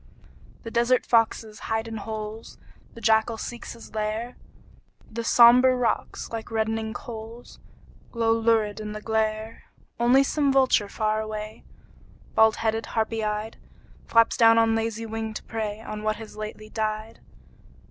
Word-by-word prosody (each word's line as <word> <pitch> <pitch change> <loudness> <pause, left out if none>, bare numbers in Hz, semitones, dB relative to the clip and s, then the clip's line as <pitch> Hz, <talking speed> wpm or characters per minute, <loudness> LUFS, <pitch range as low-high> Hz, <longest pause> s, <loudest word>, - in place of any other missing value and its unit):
The 230 - -7
desert 240 +2 +2
foxes 225 -2 +1
hide 220 0 -2
in 225 0 -5
holes, 215 +1 -7 0.4
The 230 - -10
jackal 220 +1 +2
seeks 240 +1 -7
his 230 -1 -13
lair; 220 +3 -3 0.8
The 230 +1 -4
sombre 250 +2 +7
rocks, 250 -2 -2
like 225 -1 -5
reddening 220 0 -1
coals, 230 +1 -9 0.5
Glow 230 -1 +1
lurid 225 -2 +1
in 210 -1 -5
the 215 - -7
glare. 220 0 -2 0.3
Only 245 +3 +5
some 285 0 +1
vulture 260 -6 +3
far 215 +1 0
away, 215 0 -7 0.7
Bald 220 0 +5
headed, 225 0 -1
harpy 225 0 0
eyed, 210 +1 -3 0.5
Flaps 230 0 +4
down 230 -1 +6
on 225 0 +4
lazy 225 0 -2
wing 220 0 -5
to - - -6
prey 215 -1 -4
On 215 -1 -6
what 215 0 0
has 220 -1 -10
lately 215 0 -7
died. 215 0 -3
225 Hz, 145 wpm, -25 LUFS, 215-230 Hz, 0.8 s, sombre